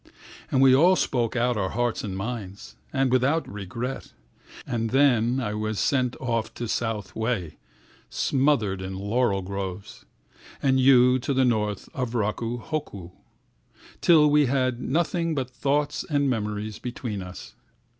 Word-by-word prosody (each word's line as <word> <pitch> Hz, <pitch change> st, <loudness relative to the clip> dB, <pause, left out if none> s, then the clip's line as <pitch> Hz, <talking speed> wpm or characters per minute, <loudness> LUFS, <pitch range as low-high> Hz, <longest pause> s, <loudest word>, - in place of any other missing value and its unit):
And 135 Hz, 0 st, +3 dB
we 130 Hz, -1 st, +7 dB
all 175 Hz, +8 st, +6 dB
spoke 120 Hz, -9 st, 0 dB
out 120 Hz, -1 st, +1 dB
our 95 Hz, -2 st, -1 dB
hearts 120 Hz, +1 st, -1 dB
and 95 Hz, -3 st, -4 dB
minds 100 Hz, -2 st, -6 dB, 0.2 s
…and 135 Hz, -2 st, +1 dB
without 135 Hz, +6 st, +2 dB
regret. 105 Hz, +6 st, -6 dB, 0.5 s
And 115 Hz, -2 st, -2 dB
then 125 Hz, -2 st, +3 dB
I 105 Hz, -5 st, -2 dB
was 110 Hz, -1 st, -2 dB
sent 130 Hz, -, +1 dB
off 115 Hz, -4 st, -2 dB
to 120 Hz, -, -4 dB
South 105 Hz, -4 st, -3 dB
Wei, 110 Hz, -9 st, -2 dB, 0.5 s
smothered 130 Hz, -9 st, +1 dB
in 95 Hz, 0 st, -5 dB
laurel 100 Hz, 0 st, 0 dB
groves, 95 Hz, 0 st, -6 dB, 0.5 s
And 130 Hz, -1 st, +2 dB
you 130 Hz, -1 st, +5 dB
to 135 Hz, +2 st, -2 dB
the 130 Hz, 0 st, +3 dB
north 105 Hz, -4 st, -1 dB
of 125 Hz, -3 st, -3 dB
Raku 115 Hz, +2 st, -1 dB
hoku, 105 Hz, -, -5 dB, 0.9 s
Till 155 Hz, -3 st, +6 dB
we 150 Hz, -1 st, +4 dB
had 130 Hz, -2 st, 0 dB
nothing 165 Hz, +3 st, 0 dB
but 130 Hz, -2 st, -3 dB
thoughts 145 Hz, +3 st, -1 dB
and 145 Hz, -2 st, +1 dB
memories 105 Hz, -3 st, -3 dB
between 120 Hz, -4 st, -5 dB
us. 90 Hz, -1 st, -9 dB
120 Hz, 145 wpm, -25 LUFS, 105-135 Hz, 0.9 s, we